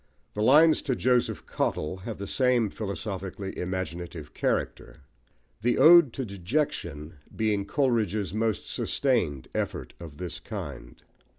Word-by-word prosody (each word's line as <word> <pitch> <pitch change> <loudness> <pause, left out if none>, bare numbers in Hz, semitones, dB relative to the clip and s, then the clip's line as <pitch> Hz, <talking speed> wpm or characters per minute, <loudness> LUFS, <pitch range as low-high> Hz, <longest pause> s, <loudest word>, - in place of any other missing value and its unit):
The 105 - -3
Lines 155 +7 +6
to 135 -4 -1
Joseph 125 0 +1
Cottle 75 +5 -2
have 105 +3 -7
the 100 - -5
same 125 -2 +2
philosophically 100 -2 -5
imaginative 90 -3 -5
character; - - -2 0.6
the 120 +2 +2
Ode 160 -1 +8
to 135 - -3
Dejection 90 - -3 0.2
being 105 -3 0
Coleridge's 110 - 0
most 110 -1 -1
sustained 85 - 0
effort - - -3
of 80 -4 -10
this 90 0 -5
kind. - - -8
105 Hz, 120 wpm, -27 LUFS, 90-125 Hz, 0.6 s, Ode